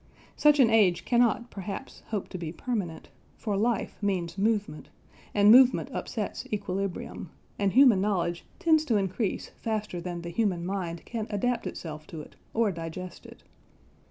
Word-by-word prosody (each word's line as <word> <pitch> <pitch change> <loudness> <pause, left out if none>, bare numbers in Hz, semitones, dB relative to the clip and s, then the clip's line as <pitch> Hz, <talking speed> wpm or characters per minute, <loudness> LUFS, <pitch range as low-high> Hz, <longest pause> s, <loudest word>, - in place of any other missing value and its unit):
Such 295 -1 +5
an 235 -4 +6
age 190 -6 +4
cannot 240 0 +2
perhaps 200 +6 -7
hope 210 -4 -3
to 185 - -6
be 165 -2 -4
permanent; 185 -4 -4 0.3
for 210 -3 -2
life 225 +3 0
means 180 -4 -1
movement, 205 -6 -1 0.5
and 205 0 +7
movement 255 +1 +6
upsets - - -4
equilibrium, 195 -3 -3 0.3
and 200 -2 +1
human 250 -7 +6
knowledge 175 -4 0
tends 315 -2 +4
to 230 -7 +2
increase 195 +2 -2
faster 215 -6 -4
than 175 -1 -5
the 170 - -5
human 180 -2 0
mind 175 -3 -4
can 225 -2 -4
adapt 235 +3 -1
itself 155 -2 -7
to 160 - -7
it - - -14 0.2
or 225 -2 +2
digest 170 +2 -7
it. - - -15
200 Hz, 155 wpm, -28 LUFS, 175-225 Hz, 0.5 s, and